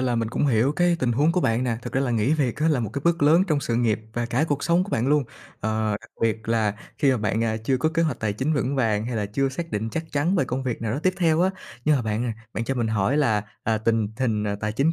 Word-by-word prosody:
là 125 Hz, -2 st, +1 dB
mình 115 Hz, -1 st, 0 dB
cũng 145 Hz, -, 0 dB
hiểu 125 Hz, +2 st, +3 dB
cái 175 Hz, +1 st, +2 dB
tình 120 Hz, -2 st, +1 dB
huống 150 Hz, +7 st, +3 dB
của 180 Hz, -, +1 dB
bạn 115 Hz, -3 st, +1 dB
nè. 115 Hz, -2 st, 0 dB
Thực -, -, -6 dB
ra 135 Hz, -, +1 dB
là 135 Hz, -3 st, 0 dB
nghỉ 115 Hz, +5 st, +2 dB
việc 135 Hz, -7 st, 0 dB
á 155 Hz, +2 st, +1 dB
là 145 Hz, -6 st, +2 dB
một 110 Hz, -, -3 dB
cái 140 Hz, -, -4 dB
bước 170 Hz, -2 st, +2 dB
lớn 160 Hz, +5 st, +6 dB
trong 150 Hz, -2 st, +2 dB
sự 115 Hz, -, -1 dB
nghiệp 115 Hz, -3 st, +1 dB
và 120 Hz, 0 st, -2 dB
cả 125 Hz, +5 st, +1 dB
cuộc 145 Hz, -1 st, -1 dB
sống 175 Hz, +2 st, +3 dB
của 205 Hz, -, -9 dB
bạn 120 Hz, -, 0 dB
luôn. 145 Hz, -2 st, +3 dB, 0.4 s
Ờ, 110 Hz, 0 st, 0 dB
đặc -, -, -17 dB
biệt 110 Hz, 0 st, 0 dB
là 110 Hz, -3 st, +1 dB, 0.2 s
khi 140 Hz, -, +4 dB
mà 130 Hz, -, +2 dB
bạn, 110 Hz, +1 st, 0 dB
à, 110 Hz, -1 st, 0 dB
chưa 120 Hz, +4 st, 0 dB
có 155 Hz, -, +1 dB
kế 165 Hz, +1 st, 0 dB
hoạch 155 Hz, -6 st, -1 dB
tài 105 Hz, -2 st, 0 dB
chính 130 Hz, +9 st, -1 dB
vững 140 Hz, 0 st, -1 dB
vàng 110 Hz, -3 st, +1 dB
hay 120 Hz, -, -3 dB
là 105 Hz, -2 st, -1 dB
chưa 135 Hz, +6 st, 0 dB
xác 165 Hz, +5 st, -5 dB
định 105 Hz, +2 st, -2 dB
chắc 165 Hz, 0 st, -3 dB
chắn 155 Hz, +7 st, +1 dB
về 175 Hz, -, +2 dB
công 130 Hz, +1 st, -3 dB
việc 120 Hz, -3 st, -3 dB
nào 110 Hz, -1 st, -1 dB
đó 140 Hz, -, -1 dB
tiếp 185 Hz, 0 st, +2 dB
theo 165 Hz, -2 st, +2 dB
á. 185 Hz, -, +3 dB, 0.3 s
Nhưng 150 Hz, -1 st, +4 dB
mà 125 Hz, -, -1 dB
bạn 110 Hz, +1 st, -1 dB
à, 120 Hz, -, -1 dB, 0.2 s
bạn 115 Hz, -, -2 dB
cho 135 Hz, -, -1 dB
mình 120 Hz, -3 st, 0 dB
hỏi 110 Hz, +5 st, +1 dB
là, 110 Hz, -9 st, +2 dB, 0.2 s
à, 110 Hz, -1 st, +1 dB
tình 110 Hz, 0 st, +1 dB
hình 110 Hz, -5 st, 0 dB, 0.2 s
tài 105 Hz, -1 st, -2 dB
chính 140 Hz, +8 st, +2 dB
125 Hz, 305 wpm, -24 LUFS, 110-150 Hz, 0.4 s, lớn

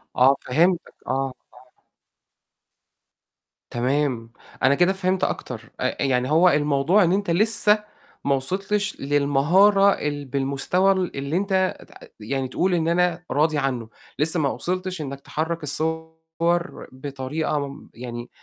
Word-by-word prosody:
آه 130 Hz, +2 st, +5 dB
فهمتك 170 Hz, +7 st, +1 dB
آه، -, -, -1 dB, 0.4 s
آه. 125 Hz, -, -22 dB, 1.9 s
تمام، 125 Hz, -2 st, -1 dB, 0.3 s
أنا 135 Hz, +1 st, +5 dB
كده 175 Hz, +5 st, +3 dB
فهمت 190 Hz, -1 st, -1 dB
أكتر -, -, -4 dB
أ -, -, -1 dB
يعني 130 Hz, -1 st, +1 dB
هو 170 Hz, +4 st, +6 dB
الموضوع 150 Hz, +6 st, +3 dB
إن 170 Hz, -, +2 dB
أنت 200 Hz, -2 st, 0 dB
لسّه 210 Hz, +2 st, +3 dB, 0.4 s
ما 140 Hz, -1 st, +3 dB
وصلتش 195 Hz, +9 st, -2 dB
للمهارة 145 Hz, +9 st, +4 dB
ال 145 Hz, -5 st, -3 dB
بالمستوى 140 Hz, +8 st, +1 dB
ال 185 Hz, -2 st, -1 dB
اللي 140 Hz, +4 st, -2 dB
أنت 190 Hz, -1 st, 0 dB
تع -, -, -15 dB
يعني 130 Hz, +5 st, -3 dB
تقول 180 Hz, +8 st, 0 dB
إن 165 Hz, -2 st, +1 dB
أنا 175 Hz, 0 st, +1 dB
راضي 155 Hz, +1 st, +2 dB
عنه، 130 Hz, -5 st, -2 dB, 0.3 s
لسّه 160 Hz, +3 st, +2 dB
ما 145 Hz, -3 st, +1 dB
وصلتش 185 Hz, +2 st, -3 dB
إنك 140 Hz, -2 st, -6 dB
تحرّك 160 Hz, +3 st, -3 dB
الصور 160 Hz, +3 st, -2 dB
بطريقة 140 Hz, +2 st, -3 dB
م 140 Hz, +1 st, -12 dB
يعني 120 Hz, 0 st, -7 dB
155 Hz, 130 wpm, -23 LUFS, 135-180 Hz, 1.9 s, هو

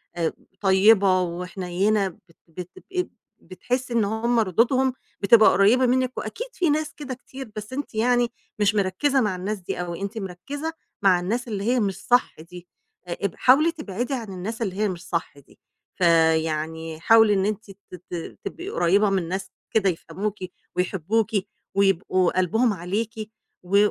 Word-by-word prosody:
آآ 165 Hz, -2 st, -1 dB, 0.3 s
طيبة 190 Hz, -1 st, +5 dB
وحنينة، 180 Hz, +3 st, -1 dB
بت 185 Hz, -, -10 dB, 0.3 s
بت 175 Hz, +2 st, -8 dB
بتبقي 375 Hz, -1 st, -4 dB, 0.3 s
بتحسّي 245 Hz, +7 st, -3 dB
إن 230 Hz, -3 st, +3 dB
هُم 225 Hz, +3 st, +1 dB
ردودهم 240 Hz, +6 st, +2 dB, 0.3 s
بتبقى 215 Hz, +2 st, +7 dB
قريبة 235 Hz, +6 st, +4 dB
منِك، 255 Hz, +1 st, +1 dB
وأكيد 485 Hz, -, -5 dB
فيه 350 Hz, -3 st, +1 dB
ناس 300 Hz, 0 st, 0 dB
كده 280 Hz, -3 st, -6 dB
كتير، 260 Hz, -1 st, -10 dB
بس 215 Hz, +4 st, -7 dB
أنتِ 280 Hz, -4 st, -5 dB
يعني 245 Hz, +2 st, +3 dB, 0.3 s
مش 205 Hz, 0 st, +3 dB
مركزة 210 Hz, +8 st, +2 dB
مع 210 Hz, -4 st, 0 dB
الناس 200 Hz, +4 st, -3 dB
دي 180 Hz, -, -5 dB
أوي، 175 Hz, 0 st, -4 dB
أنتِ 200 Hz, +3 st, -4 dB
مركزة 275 Hz, -, -5 dB, 0.3 s
مع 185 Hz, -3 st, +5 dB
الناس 230 Hz, +8 st, -2 dB
اللي 205 Hz, -3 st, -3 dB
هي 245 Hz, +4 st, +2 dB
مش 200 Hz, -4 st, 0 dB
صح 245 Hz, +1 st, +3 dB
دي، 175 Hz, +2 st, -12 dB, 0.4 s
اب 175 Hz, +2 st, -3 dB
حاولي 300 Hz, +6 st, +5 dB
تبعدي 245 Hz, -, -4 dB
عن 225 Hz, -7 st, -4 dB
الناس 215 Hz, +6 st, -5 dB
اللي 190 Hz, -4 st, -2 dB
هي 210 Hz, +1 st, +1 dB
مش 180 Hz, -1 st, -7 dB
صح 165 Hz, -4 st, -3 dB
دي، 140 Hz, -, -22 dB, 0.4 s
فيعني 160 Hz, -2 st, +1 dB
حاولي 225 Hz, +3 st, +6 dB
إن 195 Hz, -1 st, +1 dB
أنتِ 210 Hz, -1 st, -3 dB
ت 190 Hz, -, -16 dB, 0.3 s
ت 170 Hz, -2 st, -6 dB
تبقي 350 Hz, +4 st, -6 dB
قريبة 200 Hz, -, +3 dB
من 190 Hz, -4 st, 0 dB
ناس 190 Hz, +2 st, -4 dB, 0.2 s
كده 205 Hz, -3 st, +3 dB
يفهموكِ، 200 Hz, +4 st, -4 dB, 0.4 s
ويحبوكِ، 195 Hz, +5 st, 0 dB, 0.4 s
ويبقوا 185 Hz, -2 st, +2 dB
قلبهم 220 Hz, +5 st, +2 dB
عليكِ، 200 Hz, +6 st, -3 dB, 0.5 s
و 185 Hz, +3 st, +2 dB
200 Hz, 160 wpm, -24 LUFS, 180-240 Hz, 0.5 s, بتبقى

